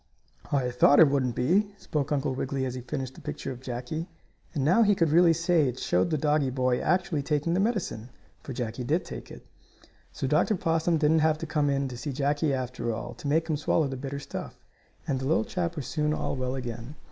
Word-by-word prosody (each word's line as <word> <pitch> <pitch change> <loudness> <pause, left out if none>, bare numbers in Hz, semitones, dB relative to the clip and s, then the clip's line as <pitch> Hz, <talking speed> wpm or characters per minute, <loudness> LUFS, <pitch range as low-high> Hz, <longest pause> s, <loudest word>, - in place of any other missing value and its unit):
"I 130 -3 +1
thought 130 +4 +5
it 160 - +8
wouldn't 130 -4 0
be," 200 +10 +1
spoke 150 -6 -3
Uncle 140 -2 0
Wiggily, 135 0 -2
as 130 - -3
he 130 - -5
finished 130 0 -4
the - - -13
picture 135 - -5
of 125 -1 -8
Jackie, 130 +7 -5 0.5
and 135 -3 0
now 185 +9 +5
he 205 -2 +5
could 165 -4 +2
really 170 +1 +6
say 165 -2 +2
it 125 - -6
showed 90 -7 +1
the 155 - +1
doggie 150 -1 +2
boy 130 -1 +1
actually 175 -4 +1
taking 150 +3 0
the 180 - +2
medicine, 195 - -1 0.3
for - - -8
Jackie 120 -1 -4
did 155 +8 0
take - - -8
it. - - -12 0.7
So - - -4
Dr. 215 - +2
Possum 165 -1 +1
didn't 155 +1 +3
have 155 0 +3
to 165 - -5
come 150 -2 +1
in 140 0 0
to 125 -2 -7
see 140 +3 -4
Jackie 145 +2 +1
after 125 -3 -2
all 115 - -5
to - - -7
make 160 +3 +2
him 155 -3 0
swallow 150 +1 +1
the 135 - -4
bitter 135 +1 -5
stuff, 140 - -7 0.5
and 135 -2 0
the 130 - -4
little 160 +10 +2
chap 180 -6 -2
was 145 -5 -4
soon 150 +3 0
all - - -2
well 130 0 -2
again. 120 +1 -6
145 Hz, 225 wpm, -27 LUFS, 130-160 Hz, 0.7 s, it